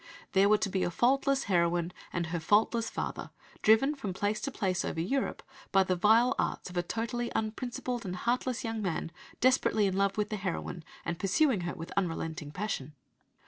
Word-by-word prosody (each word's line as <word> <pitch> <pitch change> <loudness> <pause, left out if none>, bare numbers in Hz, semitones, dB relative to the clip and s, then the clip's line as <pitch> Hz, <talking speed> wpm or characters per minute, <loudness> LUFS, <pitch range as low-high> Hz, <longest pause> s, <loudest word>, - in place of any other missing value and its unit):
There 195 +1 +4
were 215 - +6
to 210 - -1
be 190 0 -1
a - - +1
"faultless" 270 +7 +2
heroine 175 -2 +1 0.2
and 170 -1 -1
her 170 +1 -2
"faultless" 220 +6 +2
father - - -4 0.3
driven 225 +7 +5
from 255 -10 -4
place 205 +2 -1
to 275 - -2
place 190 -8 -1
over - - -3
Europe 260 +11 -1 0.3
by 195 -1 +5
the 185 -1 0
vile 220 +7 +5
arts - - -2
of 180 - -7
a - - +3
"totally 230 +5 -3
unprincipled 240 +2 -2
and 185 -3 -4
heartless 245 +4 -1
young 225 -1 -2
man, 165 -3 -2 0.3
desperately 250 -4 +3
in 190 -1 0
love 195 +1 +1
with 210 0 0
the 215 - -2
heroine, 180 -3 -4 0.2
and 170 0 -3
pursuing 210 - +2
her - - -5
with 165 -2 -8
unrelenting 165 -5 -2
passion." 155 -5 -4
205 Hz, 185 wpm, -30 LUFS, 175-235 Hz, 0.3 s, were